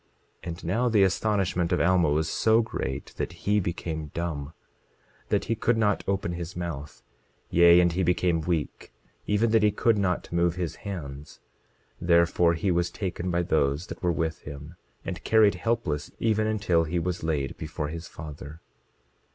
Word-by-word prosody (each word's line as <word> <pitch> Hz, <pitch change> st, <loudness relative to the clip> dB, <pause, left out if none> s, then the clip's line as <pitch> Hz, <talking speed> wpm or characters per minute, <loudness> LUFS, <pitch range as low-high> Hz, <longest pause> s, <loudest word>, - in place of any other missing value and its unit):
27:19 -, -, -11 dB
And 85 Hz, +2 st, -7 dB
now 115 Hz, +9 st, +1 dB
the 105 Hz, -3 st, +4 dB
astonishment 95 Hz, -3 st, +1 dB
of 90 Hz, -, +2 dB
Alma 90 Hz, -2 st, +3 dB
was 75 Hz, +2 st, +1 dB
so 110 Hz, +6 st, +3 dB
great 65 Hz, -10 st, -5 dB
that -, -, -3 dB
he 105 Hz, +1 st, +3 dB
became 80 Hz, -4 st, -4 dB
dumb, 80 Hz, -4 st, -3 dB, 0.8 s
that -, -, +1 dB
he 115 Hz, -, 0 dB
could 115 Hz, +1 st, +1 dB
not 105 Hz, -3 st, +1 dB
open 95 Hz, -3 st, -1 dB
his 85 Hz, 0 st, -6 dB
mouth; 80 Hz, -5 st, -6 dB, 0.5 s
yea, 85 Hz, 0 st, +7 dB
and 85 Hz, -1 st, +4 dB
he 90 Hz, +3 st, -1 dB
became 90 Hz, -1 st, +1 dB
weak, 80 Hz, -5 st, -3 dB, 0.4 s
even 105 Hz, +2 st, +2 dB
that 110 Hz, -1 st, +4 dB
he 105 Hz, -, +5 dB
could 105 Hz, +1 st, +2 dB
not 90 Hz, -3 st, -1 dB
move 85 Hz, 0 st, +2 dB
his 85 Hz, -4 st, -3 dB
hands; 75 Hz, -8 st, -7 dB, 0.6 s
therefore 85 Hz, 0 st, +3 dB
he 90 Hz, +4 st, 0 dB
was 85 Hz, 0 st, +1 dB
taken 90 Hz, -1 st, -4 dB
by 85 Hz, 0 st, +1 dB
those 75 Hz, -1 st, +1 dB
that -, -, -9 dB
were 90 Hz, -, +2 dB
with 80 Hz, 0 st, -2 dB
him, 75 Hz, +3 st, -9 dB, 0.3 s
and -, -, -5 dB
carried 110 Hz, -2 st, +5 dB
helpless, 90 Hz, -7 st, -2 dB
even 110 Hz, -1 st, +1 dB
until 100 Hz, -6 st, +1 dB
he 85 Hz, +3 st, -2 dB
was 90 Hz, +1 st, -2 dB
laid 75 Hz, -5 st, -1 dB
before 75 Hz, -1 st, -4 dB
his 85 Hz, +2 st, -6 dB
father. 75 Hz, 0 st, -9 dB
85 Hz, 170 wpm, -27 LUFS, 80-100 Hz, 0.8 s, yea